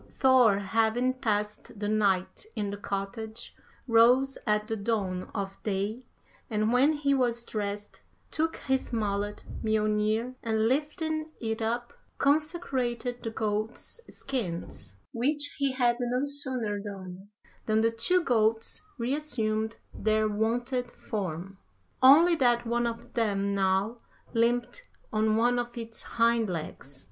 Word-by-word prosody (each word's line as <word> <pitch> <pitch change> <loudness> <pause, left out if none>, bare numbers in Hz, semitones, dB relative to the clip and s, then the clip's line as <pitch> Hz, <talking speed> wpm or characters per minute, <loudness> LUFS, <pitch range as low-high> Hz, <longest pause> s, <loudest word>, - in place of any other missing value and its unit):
Thor 255 -6 +5
having 225 +5 +1
passed 210 -4 -2
the 205 - -2
night 205 - +1
in 205 -1 -2
the 205 - -5
cottage, 210 +3 -5 0.3
rose 250 +4 +5
at 210 0 +2
the 225 - -1
dawn 200 -4 -2
of 195 -2 -4
day, 205 +3 -2 0.5
and 215 0 +1
when 275 +5 +5
he 285 -2 +1
was 240 -3 +1
dressed 205 -1 -4 0.3
took 325 +1 0
his 265 -1 -1
mallet 205 -2 -2 0.2
Mjolnir, 215 +2 +1
and 220 -1 +1
lifting 310 +3 -1
it 225 -1 -3
up, 240 +2 -2 0.2
consecrated 270 -5 0
the 225 - -3
goats' 220 - -3
skins, 170 - -4 0.2
which 290 +5 +1
he 275 -2 +1
had 240 -2 +2
no 250 +2 0
sooner 260 -7 +2
done 195 -1 -8 0.4
than 220 0 +3
the 230 0 +3
two 360 +11 +2
goats 225 -4 +1 0.2
re 245 +2 -1
assumed 220 -7 -1 0.2
their 215 +1 +1
wonted 240 +4 -1
form, 190 -4 -5 0.4
only 315 +7 +8
that 240 -3 +3
one 235 +1 +1
of 230 0 -6
them 200 -3 0
now 195 +4 +1 0.3
limped 240 - 0 0.2
on 215 0 +2
one 245 +2 +3
of 240 0 -4
its 230 -1 -5
hind 230 -2 +2
legs. 150 -5 -6
225 Hz, 130 wpm, -28 LUFS, 210-250 Hz, 0.5 s, only